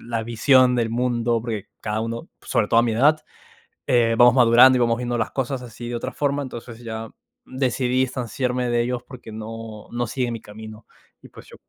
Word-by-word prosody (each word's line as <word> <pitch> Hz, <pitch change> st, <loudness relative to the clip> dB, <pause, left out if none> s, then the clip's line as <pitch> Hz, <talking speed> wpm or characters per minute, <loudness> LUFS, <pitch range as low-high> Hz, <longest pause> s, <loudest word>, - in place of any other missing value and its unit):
la 115 Hz, -1 st, -3 dB
visión 125 Hz, +3 st, +4 dB
del 115 Hz, -2 st, 0 dB
mundo, 120 Hz, -1 st, 0 dB
porque 110 Hz, -3 st, -5 dB
cada 105 Hz, 0 st, -2 dB
uno, 115 Hz, +1 st, -5 dB
sobre 105 Hz, -, 0 dB
todo 115 Hz, -, +5 dB
a -, -, +1 dB
mi 115 Hz, -2 st, 0 dB
edad, 150 Hz, +7 st, +3 dB, 0.6 s
eh, 115 Hz, -2 st, +3 dB
vamos 120 Hz, -1 st, +7 dB
madurando 125 Hz, +1 st, +7 dB
y 125 Hz, -, +1 dB
vamos 115 Hz, -1 st, +2 dB
viendo 120 Hz, 0 st, -2 dB
las 115 Hz, -, -2 dB
cosas 135 Hz, -1 st, -3 dB
así 120 Hz, 0 st, -9 dB
de 120 Hz, -, -3 dB
otra 115 Hz, -, -4 dB
forma. 145 Hz, 0 st, -1 dB
Entonces, 120 Hz, -3 st, -9 dB
ya 110 Hz, -1 st, -6 dB, 0.4 s
decidí 130 Hz, -1 st, 0 dB
distanciarme 125 Hz, 0 st, -2 dB
de 120 Hz, 0 st, +2 dB
ellos 125 Hz, 0 st, -3 dB
porque 125 Hz, -4 st, -11 dB
no 110 Hz, 0 st, -8 dB
no 120 Hz, 0 st, -2 dB
siguen 120 Hz, +1 st, -2 dB
mi 115 Hz, -, -6 dB
camino. 110 Hz, +1 st, -11 dB, 0.4 s
Y -, -, -15 dB
pues -, -, -15 dB
yo -, -, -14 dB
120 Hz, 200 wpm, -22 LUFS, 115-125 Hz, 0.6 s, vamos